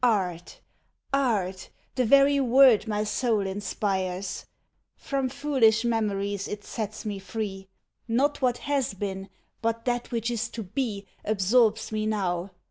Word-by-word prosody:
Art! 185 Hz, -7 st, 0 dB, 0.5 s
art! 210 Hz, -9 st, 0 dB, 0.2 s
the 255 Hz, -, +1 dB
very 280 Hz, +2 st, +6 dB
word 255 Hz, -3 st, +6 dB
my 210 Hz, -1 st, 0 dB
soul 220 Hz, 0 st, +1 dB
inspires! 190 Hz, -1 st, -2 dB, 0.5 s
From 270 Hz, -2 st, -2 dB
foolish 255 Hz, -5 st, +2 dB
memories 200 Hz, -3 st, -1 dB
it 205 Hz, 0 st, -6 dB
sets 215 Hz, 0 st, -5 dB
me 205 Hz, -2 st, -3 dB
free. 195 Hz, -1 st, -5 dB, 0.4 s
Not 275 Hz, +6 st, +1 dB
what 250 Hz, -2 st, +2 dB
has 280 Hz, -7 st, 0 dB
been, 195 Hz, 0 st, -4 dB, 0.3 s
but 230 Hz, 0 st, -1 dB
that 245 Hz, -1 st, -1 dB
which 230 Hz, 0 st, -1 dB
is 235 Hz, -2 st, -2 dB
to 225 Hz, -, -3 dB
be 205 Hz, -1 st, -3 dB, 0.2 s
Absorbs 215 Hz, +3 st, +2 dB
me 215 Hz, 0 st, -1 dB
now. 190 Hz, -4 st, -1 dB
215 Hz, 130 wpm, -27 LUFS, 195-245 Hz, 0.5 s, very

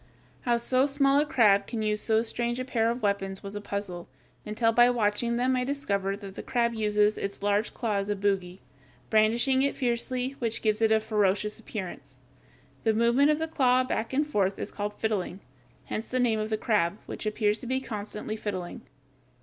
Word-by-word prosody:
How 240 Hz, -1 st, +2 dB
so 255 Hz, +3 st, +2 dB
small 275 Hz, 0 st, +3 dB
a 300 Hz, -, +1 dB
crab 210 Hz, -9 st, +4 dB
can 225 Hz, -3 st, -3 dB
use 210 Hz, 0 st, 0 dB
so 220 Hz, 0 st, +2 dB
strange 235 Hz, +1 st, -2 dB
a 255 Hz, -, -3 dB
pair 230 Hz, -3 st, +1 dB
of 240 Hz, +1 st, -3 dB
weapons 195 Hz, -1 st, -1 dB
was 200 Hz, 0 st, -7 dB
a 205 Hz, -, -5 dB
puzzle, 200 Hz, -4 st, -5 dB, 0.4 s
until 225 Hz, +2 st, +2 dB
by 240 Hz, +2 st, +6 dB
watching 235 Hz, 0 st, +1 dB
them, 255 Hz, +1 st, +2 dB
I 250 Hz, -, 0 dB
discovered 200 Hz, -8 st, -2 dB
that 195 Hz, -1 st, -8 dB
the -, -, -7 dB
crab 235 Hz, -2 st, 0 dB
uses 210 Hz, -1 st, +2 dB
its 200 Hz, 0 st, -5 dB
large 205 Hz, +2 st, +1 dB
claw 220 Hz, -5 st, -1 dB
as 200 Hz, +1 st, -2 dB
a 205 Hz, -, +1 dB
bogy, 195 Hz, -2 st, -1 dB, 0.5 s
brandishing 235 Hz, +5 st, +3 dB
it 280 Hz, -, 0 dB
fiercely, 250 Hz, 0 st, -1 dB
which 230 Hz, -2 st, -2 dB
gives 215 Hz, 0 st, +1 dB
it 225 Hz, -, +5 dB
a 220 Hz, -, +6 dB
very -, -, -2 dB
ferocious 210 Hz, -1 st, 0 dB
appearance. 185 Hz, -9 st, -7 dB, 0.7 s
The 220 Hz, -1 st, +2 dB
movement 235 Hz, +6 st, +4 dB
of 300 Hz, -, +3 dB
the 320 Hz, +1 st, -2 dB
claw 255 Hz, -5 st, +3 dB
back 225 Hz, -3 st, -2 dB
and 290 Hz, +3 st, +1 dB
forth 200 Hz, -9 st, 0 dB
is -, -, -5 dB
called 205 Hz, 0 st, -4 dB
fiddling, 195 Hz, -4 st, -2 dB, 0.5 s
hence 215 Hz, -, -4 dB
the 255 Hz, -, -1 dB
name 230 Hz, -3 st, +2 dB
of 215 Hz, 0 st, -2 dB
the 215 Hz, -, 0 dB
crab, 205 Hz, -5 st, +1 dB
which -, -, -5 dB
appears 210 Hz, 0 st, +1 dB
to 250 Hz, -, -8 dB
be 260 Hz, +1 st, +1 dB
constantly 215 Hz, -3 st, -5 dB
fiddling. 190 Hz, -5 st, -5 dB
220 Hz, 200 wpm, -28 LUFS, 205-245 Hz, 0.7 s, by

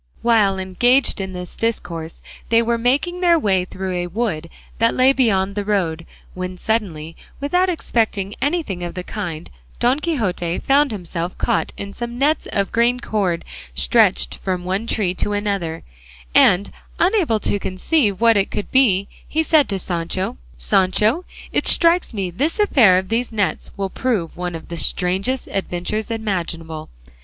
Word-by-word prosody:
While 215 Hz, -5 st, +3 dB
engaged 205 Hz, +7 st, +2 dB
in 190 Hz, -1 st, -5 dB
this 180 Hz, -1 st, -7 dB
discourse 170 Hz, -8 st, -3 dB, 0.3 s
they 230 Hz, 0 st, +4 dB
were 235 Hz, 0 st, 0 dB
making 290 Hz, +10 st, 0 dB
their 345 Hz, -2 st, +5 dB
way 190 Hz, -, +1 dB
through 185 Hz, 0 st, -5 dB
a 175 Hz, 0 st, -2 dB
wood 175 Hz, -5 st, -2 dB, 0.3 s
that 230 Hz, +1 st, +3 dB
lay 260 Hz, +1 st, +5 dB
beyond 200 Hz, -7 st, +1 dB
the 205 Hz, 0 st, -2 dB
road, 175 Hz, -6 st, -1 dB, 0.3 s
when 185 Hz, 0 st, -5 dB
suddenly, 170 Hz, -8 st, -2 dB, 0.2 s
without 360 Hz, +6 st, +1 dB
expecting 220 Hz, -, -1 dB
anything 285 Hz, -, -1 dB
of 175 Hz, -, -5 dB
the 180 Hz, -, -4 dB
kind, 175 Hz, -6 st, -5 dB, 0.3 s
Don 250 Hz, +4 st, +2 dB
Quixote 195 Hz, -, -1 dB
found 280 Hz, +1 st, +3 dB
himself 175 Hz, -4 st, -5 dB
caught 235 Hz, -, 0 dB
in 200 Hz, 0 st, -6 dB
some 240 Hz, 0 st, -5 dB
nets 295 Hz, +4 st, +1 dB
of 200 Hz, -1 st, 0 dB
green 235 Hz, +2 st, +2 dB
cord 195 Hz, -8 st, -1 dB, 0.3 s
stretched -, -, +3 dB
from 185 Hz, -2 st, -3 dB
one 195 Hz, +5 st, -2 dB
tree 195 Hz, -7 st, 0 dB
to 205 Hz, +3 st, -2 dB
another; 200 Hz, -6 st, -2 dB, 0.5 s
and 185 Hz, +3 st, +5 dB, 0.3 s
unable 350 Hz, -, +2 dB
to 205 Hz, -, 0 dB
conceive 200 Hz, -, 0 dB
what 230 Hz, -2 st, +5 dB
it 195 Hz, -, +1 dB
could 205 Hz, -, -5 dB
be, 200 Hz, -8 st, +3 dB, 0.2 s
he 320 Hz, +1 st, 0 dB
said 310 Hz, -2 st, +3 dB
to 195 Hz, -, 0 dB
Sancho, 175 Hz, -, -3 dB, 0.2 s
"Sancho, 210 Hz, -, +2 dB, 0.3 s
it -, -, 0 dB
strikes 340 Hz, +1 st, +5 dB
me 195 Hz, -5 st, -3 dB
this 285 Hz, -, -1 dB
affair 250 Hz, -, +5 dB
of 185 Hz, 0 st, -2 dB
these 235 Hz, +2 st, -1 dB
nets 205 Hz, -3 st, -1 dB
will 195 Hz, -1 st, -2 dB
prove 220 Hz, -11 st, -1 dB
one 175 Hz, -1 st, -4 dB
of 165 Hz, -, -9 dB
the 170 Hz, -, -5 dB
strangest 195 Hz, +10 st, 0 dB
adventures 195 Hz, +3 st, -3 dB
imaginable. 170 Hz, -8 st, -4 dB
200 Hz, 160 wpm, -20 LUFS, 180-240 Hz, 0.5 s, their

